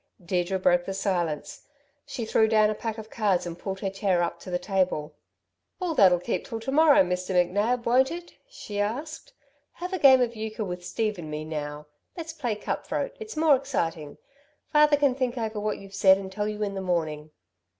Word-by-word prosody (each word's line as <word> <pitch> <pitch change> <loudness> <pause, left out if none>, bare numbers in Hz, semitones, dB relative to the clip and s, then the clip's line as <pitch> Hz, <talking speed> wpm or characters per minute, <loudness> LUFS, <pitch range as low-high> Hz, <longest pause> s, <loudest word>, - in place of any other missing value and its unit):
Deirdre 180 +1 0
broke 175 -1 +2
the 195 - -4
silence. 175 -6 -2 0.4
She 235 - -4
threw 220 0 +3
down 215 -1 +4
a - - 0
pack 220 +1 -4
of 220 0 -9
cards 200 -6 +1
and 170 -1 -5
pulled 195 -1 -5
her 195 - -1
chair 190 -3 +1
up 170 - -3
to - - -10
the 180 - 0
table. 180 -5 -1 0.7
"All 360 -3 -1
that'll 185 - +5
keep 180 +6 -2
till 225 - -5
to 255 +4 -3
morrow, 300 -5 +6
Mr. 180 +1 -2
McNab, 205 +7 +1
won't 255 +3 +4
it?" 345 +1 -7 0.2
she 210 - -7
asked. 295 - -4 0.4
"Have 360 +2 -6
a 375 - -1
game 265 -2 +7
of 240 -1 0
euchre 220 0 -4
with 180 -1 -6
Steve 215 +1 -2
and 155 -2 -7
me, 150 0 -4
now. 150 -1 -5 0.3
Let's 325 -1 -6
play 245 -9 -2
cut 210 - -4
throat - - -2
it's 435 -6 -8
more 310 -2 +5
exciting. 165 - -3 0.6
Father 300 -1 +5
can 280 -2 +3
think 255 -1 -2
over 220 -2 -3
what 210 0 -2
you've 195 0 -13
said 190 -1 +6
and 190 -1 -7
tell 205 +2 -2
you 210 0 -3
in 200 -1 -2
the 195 - -4
morning." 155 -4 -2
205 Hz, 205 wpm, -26 LUFS, 180-250 Hz, 0.7 s, game